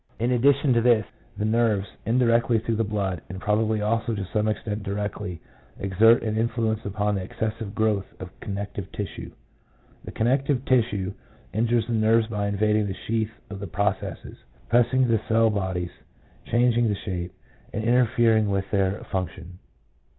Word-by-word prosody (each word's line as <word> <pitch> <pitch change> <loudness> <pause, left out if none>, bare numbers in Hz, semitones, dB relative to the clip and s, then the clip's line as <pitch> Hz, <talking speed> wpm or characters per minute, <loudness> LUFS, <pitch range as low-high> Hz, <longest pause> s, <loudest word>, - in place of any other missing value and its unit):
In 120 +2 +1
addition 135 +2 +4
to 115 - +3
this, 115 -3 +4 0.3
the 105 - -1
nerves, 110 -3 +2 0.2
in 115 +3 +2
directly 115 -1 +3
through 115 0 -1
the 115 - +2
blood, 100 -5 -2
and 95 0 -6
probably 105 +1 +1
also 115 +1 0
to 100 -2 -3
some 105 0 +1
extent 105 0 -2
directly, 100 -2 -4 0.4
exert 110 +6 +4
an 110 -1 -1
influence 115 -1 0
upon 105 +1 -1
the 100 - -1
excessive 110 +2 -4
growth 105 -3 +1
of 95 -1 -8
connective 100 -1 -5
tissue. 100 -2 -5 0.7
The - - -8
con 110 - -1
nective 135 +1 +1
tissue 105 -6 +1 0.4
injures 115 +2 +1
the 120 - -3
nerves 110 +1 +3
by 105 -2 -2
invading 105 +1 +1
the 95 - -4
sheath 110 -1 0 0.2
of 100 - -6
the 100 - -5
processes, 100 +2 -2 0.3
pressing 125 +2 +3
the 115 -2 +2
cell 115 0 +4
bodies, 95 -3 -2 0.6
changing 120 0 +3
the 105 - 0
shape, 90 -3 -5 0.4
and 110 - -3
interfering 115 -2 +3
with 100 0 -1
their 100 0 0
func 95 -3 -1
tion. 90 0 -12
110 Hz, 165 wpm, -25 LUFS, 100-115 Hz, 0.7 s, addition